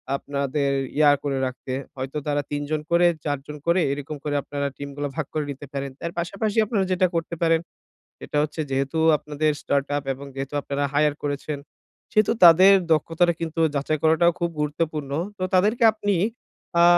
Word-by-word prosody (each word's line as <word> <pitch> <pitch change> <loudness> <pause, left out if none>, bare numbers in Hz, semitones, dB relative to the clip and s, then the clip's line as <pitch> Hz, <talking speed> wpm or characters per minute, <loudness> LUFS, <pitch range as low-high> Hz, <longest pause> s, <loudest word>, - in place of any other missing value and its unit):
আপনাদের 140 0 -1 0.3
ইয়া 150 -1 +6
করে 140 -2 -1
রাখতে। 130 0 -5 0.2
হয়তো 130 +2 -5
তারা 145 0 +1
৩ 145 0 -1
জন 155 -1 0
করে 175 +1 +5 0.2
৪ 145 -2 0
জন 150 - -7
করে 170 +2 +4
এরকম 145 +2 -5
করে 145 -1 -2
আপনারা 140 -1 -3
টিম 140 0 -6
গুলা 145 0 -3
ভাগ 160 - -2
করে 155 -1 -1
নিতে 140 +1 -8
পারেন। 140 0 -3
তার 170 0 -3
পাশাপাশি 200 +5 -2
আপনারা 205 -3 0
যেটা 185 0 +3
করতে 165 +1 -2
পারেন। 165 -1 +4 0.7
এটা - - -5
হচ্ছে 155 +1 -3
যেহেতু 135 +3 -1 0.2
আপনাদের 150 +1 -1
স্টার্টআপ 140 0 -1
এবং 140 +2 -10
যেহেতু 135 +1 -5
আপনারা 140 0 -2
হায়ার 150 0 +2
করেছেন। 145 +1 -3 0.5
সেহেতু 215 -2 +3
তাদের 180 +3 +9 0.2
দক্ষতাটা 165 +3 +2
কিন্তু 165 0 -3
যাচাই 145 +2 0
করাটাও 160 +2 +4
খুব 170 0 0
গুরুত্বপূর্ণ। 150 -1 -2 0.3
তো 185 - -1
তাদেরকে 210 +6 +3
আপনি 205 -2 0 0.7
আ - - +7
150 Hz, 175 wpm, -24 LUFS, 140-170 Hz, 0.7 s, তাদের